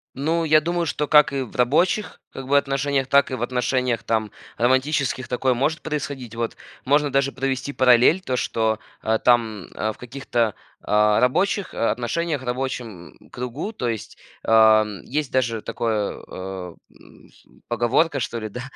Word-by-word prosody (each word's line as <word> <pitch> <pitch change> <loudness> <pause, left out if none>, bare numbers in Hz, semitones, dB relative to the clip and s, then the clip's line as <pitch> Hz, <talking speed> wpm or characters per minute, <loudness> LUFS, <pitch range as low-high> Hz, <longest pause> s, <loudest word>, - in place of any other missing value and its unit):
Ну, 160 +5 0
я 155 -1 +5
думаю, 170 +1 -1
что 150 0 -2
как 150 -2 +5
и 135 - -1
в 125 - -12
рабочих, 155 - +1
как 135 -1 -8
бы, 140 +1 +4
отношениях, 135 -1 0
так 140 0 +4
и 130 - -1
в 120 - -4
отношениях 125 -1 0
там 110 -2 -1 0.3
романтических 130 +1 +1
такое 130 +1 +1
может 140 +6 -1
происходить. 140 -6 -5
Вот. 115 0 -3 0.3
Можно 145 +1 +2
даже 140 0 +1
провести 135 +1 -3
параллель, 130 +8 +5
то 130 -8 -2
что 110 -3 0 0.4
там, 115 -5 +2
э, 110 - -2
в - - -21
каких-то, 120 -3 -2 0.3
а, 105 0 +3
рабочих 185 - +1
о 115 - +1
отношениях, 150 +4 -2
рабочем 125 - -5
кругу, 125 - -5
то 125 -11 -2
есть, 110 -3 -6 0.3
а, 110 -1 +6
м 105 -3 -7
есть 145 +1 -2
даже 115 -4 0
такое, 110 -3 -2
э, 95 -2 -7 0.2
м, - - -19 0.4
поговорка, 120 +7 +1
что 115 - -3
ли 110 -1 -5
да, 125 +4 -7
125 Hz, 160 wpm, -23 LUFS, 115-140 Hz, 0.4 s, а